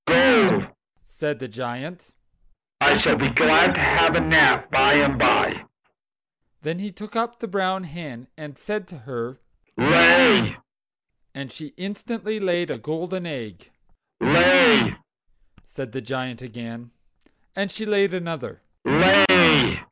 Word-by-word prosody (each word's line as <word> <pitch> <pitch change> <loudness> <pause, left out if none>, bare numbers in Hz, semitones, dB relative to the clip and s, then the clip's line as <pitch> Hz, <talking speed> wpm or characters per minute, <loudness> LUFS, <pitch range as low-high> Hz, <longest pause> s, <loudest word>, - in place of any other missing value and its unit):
"Go, 235 -7 +3 0.3
said 150 -2 -6
the 130 - -10
Giant; 130 - -11 0.7
"I - - +4
shall - - +1
be - - -1
glad - - +3
to - - -1
have - - +2
a - - +2
nap - - +3
by 135 +1 +3
and 140 -3 +1
by." - - 0 1.0
Then 160 +4 -6
he 205 +1 -8
took 205 +3 -14
up 235 +1 -4
the 230 - -8
brown 190 -1 -4
hen 145 -7 -12
and 150 -3 -14
said 210 -2 -7
to 175 - -17
her: 125 -1 -10 0.4
"Lay!" 85 0 +4 0.8
And 135 -1 -10
she 155 -2 -14
instantly 210 +3 -8
laid 175 -4 -3
a - - -8
golden 175 +3 -7
egg. 115 - -11 0.5
"Lay!" 90 0 +3 0.7
said 130 -4 -11
the 130 - -8
Giant 130 -2 -8
again. 120 -1 -12 0.7
And 195 +1 -4
she 220 +3 -9
laid 200 -2 -1
another. 170 -6 -8
160 Hz, 130 wpm, -20 LUFS, 130-195 Hz, 1.0 s, I